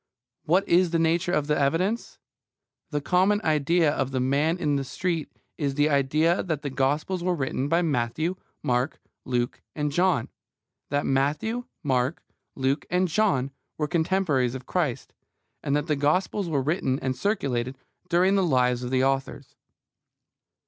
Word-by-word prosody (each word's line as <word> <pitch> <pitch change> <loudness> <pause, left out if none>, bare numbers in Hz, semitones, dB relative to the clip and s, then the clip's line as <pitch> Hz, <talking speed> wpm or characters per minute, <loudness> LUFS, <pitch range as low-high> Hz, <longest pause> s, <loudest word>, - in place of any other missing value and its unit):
What 185 +5 +2
is 175 +1 +4
the 165 - +1
nature 170 +2 +1
of 150 -5 +1
the 150 0 +1
evidence? 170 +11 0 0.7
The 150 -2 -2
common 185 +7 +3
idea 155 +1 +2
of 135 - -1
the 130 -1 -2
man 140 +6 +1
in 150 -5 0
the 140 - 0
street 165 +3 -2 0.3
is 140 -3 -1
the 145 +1 +3
idea 150 +5 +2
that 160 -4 -3
the 140 - -3
Gospels 150 +7 0
were 180 0 +1
written 135 -2 -2
by 170 +3 +2
Matthew, 150 +3 0 0.3
Mark, 125 +3 0 0.3
Luke, 120 -1 -1
and 150 -1 -1
John; 175 -6 +1 0.6
that 145 0 0
Matthew, 150 - 0 0.2
Mark, 130 +1 0 0.3
Luke, 135 +2 -1
and 180 +1 +2
John 155 -8 +1 0.3
were 150 - -1
contemporaries 160 -7 +1
of 130 -1 -7
Christ; 155 -8 -2 0.5
and 140 - 0
that 145 0 0
the 155 -3 +1
Gospels 175 +6 0
were 140 -4 0
written 135 -3 0
and 130 -1 -2
circulated 130 - -1 0.3
during 180 +2 +3
the 195 -1 +3
lives 125 -6 +2
of 125 - -4
the 130 0 +2
authors. 135 0 -2
150 Hz, 155 wpm, -26 LUFS, 135-175 Hz, 0.7 s, is